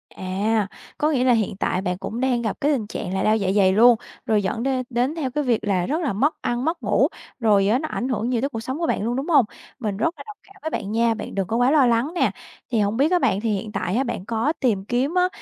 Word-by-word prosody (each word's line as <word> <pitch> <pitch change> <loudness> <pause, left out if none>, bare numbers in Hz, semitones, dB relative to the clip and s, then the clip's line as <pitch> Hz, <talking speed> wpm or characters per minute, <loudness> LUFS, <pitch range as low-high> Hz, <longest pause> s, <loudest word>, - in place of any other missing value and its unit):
À, 200 +3 0 0.3
có 300 - +2
nghĩa 260 -4 +1
là 255 -1 +4
hiện 215 -4 0
tại 185 - -1
bạn 180 -2 -2
cũng 220 +4 -5
đang 255 -2 +1
gặp 220 -3 -2
cái 290 - +3
tình 240 -8 -1
trạng 195 -3 -5
là 190 - 0
đau 215 +1 +3
dạ 195 -3 -1
dày 190 -2 +5
luôn, 235 +4 +7 0.3
rồi 210 -2 +2
dẫn 210 +4 -2
đên 260 -1 0
đến 250 +5 0
theo 280 -6 -2
cái 295 +3 -1
việc 240 -5 +1
là 190 -4 +1
rất 310 - -1
là 285 -9 -1
mất 280 - +2
ăn, 240 +2 -1
mất 330 +2 -2
ngủ, - - +3 0.3
rồi 205 -4 +3
á 225 +5 +3
nó 310 - -3
ảnh 255 - -3
hưởng 230 -1 -1
nhiều 240 -3 0
tới 275 - 0
cuộc 225 - -5
sống 260 +6 -4
của 335 - 0
bạn - - 0
luôn, 235 +2 -1
đúng 275 +6 -3
hông? 285 -8 +5 0.3
Mình 210 -5 -3
rất 235 +11 0
là 280 - -9
đồng 425 0 -9
cảm 395 - -20
với 315 - -3
bạn 200 -9 -4
nha, 230 +1 +2
bạn 220 - -7
đừng 195 -2 -1
có 220 - -2
quá 245 +2 +3
lo 290 -3 +5
lắng 240 +5 +2
nè. - - +2 0.4
Thì 230 - +2
hông 205 +1 +1
biết 290 +6 +3
á 360 - +4
bạn 195 - +1
thì 230 - -1
hiện 210 +2 -4
tại 185 -2 -2
á 265 - +2
bạn 235 -7 -4
có 230 +7 0
tìm 205 -7 +1
kiếm 250 +7 0
á, 360 0 +3
235 Hz, 290 wpm, -23 LUFS, 210-270 Hz, 0.4 s, luôn